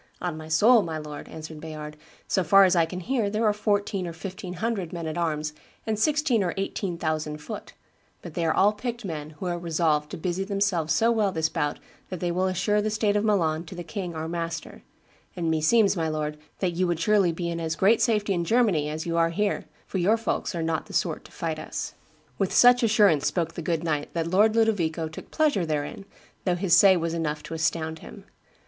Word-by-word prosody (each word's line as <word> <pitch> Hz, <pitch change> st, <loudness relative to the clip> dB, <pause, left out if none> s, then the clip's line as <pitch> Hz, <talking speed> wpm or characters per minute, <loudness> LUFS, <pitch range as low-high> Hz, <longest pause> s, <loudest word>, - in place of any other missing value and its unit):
'On 175 Hz, -3 st, -3 dB
my 155 Hz, 0 st, -8 dB
soul, 220 Hz, +9 st, +5 dB
my 165 Hz, -4 st, -4 dB
lord,' 150 Hz, -1 st, -8 dB
answered 160 Hz, -1 st, -8 dB
Bayard, 150 Hz, -1 st, -7 dB, 0.3 s
'so 190 Hz, -, +1 dB
far 195 Hz, +2 st, +7 dB
as 185 Hz, -1 st, +4 dB
I 165 Hz, -1 st, +3 dB
can 180 Hz, +2 st, -6 dB
hear, 230 Hz, 0 st, 0 dB
there 215 Hz, +2 st, 0 dB
are 210 Hz, -, +4 dB
fourteen 205 Hz, -2 st, -1 dB
or 170 Hz, -, -5 dB
fifteen 180 Hz, +2 st, -7 dB
hundred 195 Hz, -3 st, -2 dB
men 170 Hz, -2 st, -5 dB
at 155 Hz, -, -3 dB
arms 155 Hz, -3 st, -1 dB, 0.3 s
and 215 Hz, -1 st, -1 dB
sixteen 290 Hz, -4 st, +2 dB
or 175 Hz, -, -2 dB
eighteen 195 Hz, -2 st, -3 dB
thousand 155 Hz, -2 st, -2 dB
foot; 150 Hz, -, -8 dB, 0.5 s
but 170 Hz, -, -8 dB
they 170 Hz, -, -2 dB
are 160 Hz, -, +2 dB
all 205 Hz, +6 st, +4 dB
picked 235 Hz, +1 st, -5 dB
men, 155 Hz, -3 st, -6 dB
who 185 Hz, -, -6 dB
are 175 Hz, -1 st, -2 dB
resolved 160 Hz, -3 st, 0 dB
to -, -, -6 dB
busy 180 Hz, +3 st, -2 dB
themselves 195 Hz, -5 st, 0 dB
so 230 Hz, +1 st, +3 dB
well 215 Hz, -4 st, +2 dB
this 160 Hz, -2 st, 0 dB
bout 150 Hz, -4 st, -1 dB, 0.3 s
that 185 Hz, -, -5 dB
they 175 Hz, 0 st, -1 dB
will 185 Hz, +2 st, +1 dB
assure 205 Hz, +3 st, +1 dB
the 215 Hz, -, 0 dB
state 210 Hz, -1 st, +1 dB
of 205 Hz, -, +2 dB
Milan 170 Hz, -7 st, +1 dB
to 170 Hz, -, -9 dB
the 175 Hz, -, -6 dB
king 170 Hz, +1 st, -5 dB
our 160 Hz, 0 st, -3 dB
master; 165 Hz, -1 st, -5 dB, 0.5 s
and 165 Hz, -2 st, -1 dB
meseems, 195 Hz, +7 st, +3 dB
my 165 Hz, -3 st, -1 dB
lord, 150 Hz, -1 st, -3 dB, 0.2 s
that 185 Hz, -2 st, +1 dB
you 180 Hz, +2 st, +1 dB
would 170 Hz, -2 st, -1 dB
surely 195 Hz, 0 st, +3 dB
be 170 Hz, +1 st, -4 dB
in 170 Hz, -, -3 dB
as 160 Hz, -1 st, -2 dB
great 205 Hz, +7 st, +4 dB
safety 210 Hz, -4 st, +2 dB
in 175 Hz, -2 st, 0 dB
Germany 185 Hz, -7 st, +2 dB
as 155 Hz, +1 st, -4 dB
you 170 Hz, 0 st, -1 dB
are 165 Hz, 0 st, +3 dB
here, 205 Hz, +4 st, -1 dB, 0.2 s
for 190 Hz, -, -3 dB
your 205 Hz, +6 st, +3 dB
folks 225 Hz, -4 st, -2 dB
are 165 Hz, -, -2 dB
not 160 Hz, -1 st, -2 dB
the -, -, -11 dB
sort -, -, -1 dB
to -, -, -14 dB
fight -, -, -3 dB
us.' -, -, -5 dB, 0.5 s
With 195 Hz, -2 st, +1 dB
such 245 Hz, +1 st, +6 dB
assurance 205 Hz, -, +4 dB
spoke 165 Hz, -2 st, -1 dB
the 170 Hz, -, -5 dB
good 165 Hz, 0 st, -1 dB
knight 150 Hz, -3 st, -2 dB
that 165 Hz, -1 st, 0 dB
Lord 205 Hz, +6 st, +3 dB
Ludovico 175 Hz, -8 st, +1 dB
took 155 Hz, -, -10 dB
pleasure 300 Hz, -, +2 dB
there 150 Hz, -3 st, -1 dB
in, 195 Hz, -, -9 dB, 0.4 s
though 180 Hz, -2 st, +1 dB
his 175 Hz, -1 st, +3 dB
say 190 Hz, +1 st, +7 dB
was 165 Hz, -1 st, -2 dB
enough 150 Hz, -2 st, -2 dB
to -, -, -7 dB
astound 160 Hz, 0 st, -1 dB
him. -, -, -11 dB
175 Hz, 225 wpm, -26 LUFS, 160-205 Hz, 0.5 s, far